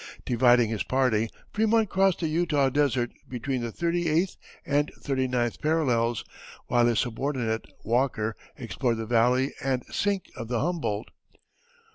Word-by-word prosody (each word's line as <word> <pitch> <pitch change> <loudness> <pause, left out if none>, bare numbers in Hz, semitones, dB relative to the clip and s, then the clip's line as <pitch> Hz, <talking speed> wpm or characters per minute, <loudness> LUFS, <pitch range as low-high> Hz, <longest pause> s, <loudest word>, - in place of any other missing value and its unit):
Dividing 120 -2 +4
his 110 - -2
party 120 -4 +1 0.2
Frémont 220 +1 +3
crossed 190 -1 +2
the 165 - +1
Utah 155 -4 +2
desert 130 -4 +1 0.2
between 125 +1 -2
the 120 -1 -3
thirty 170 +3 0
eighth 170 +5 +1 0.3
and 145 +1 +1
thirty 130 -2 -1
ninth 120 -2 -1
parallels, 125 -8 +1 0.4
while 120 -1 +3
his 120 -2 +2
subordinate, 120 -1 -1 0.2
Walker, 115 -2 0 0.2
explored 120 0 -1
the 115 - -3
valley 125 +4 +2
and 130 -2 0
sink 200 -2 -1
of 115 -3 -6
the 120 0 -1
Humboldt. 145 -10 -2
130 Hz, 140 wpm, -27 LUFS, 115-155 Hz, 0.4 s, Dividing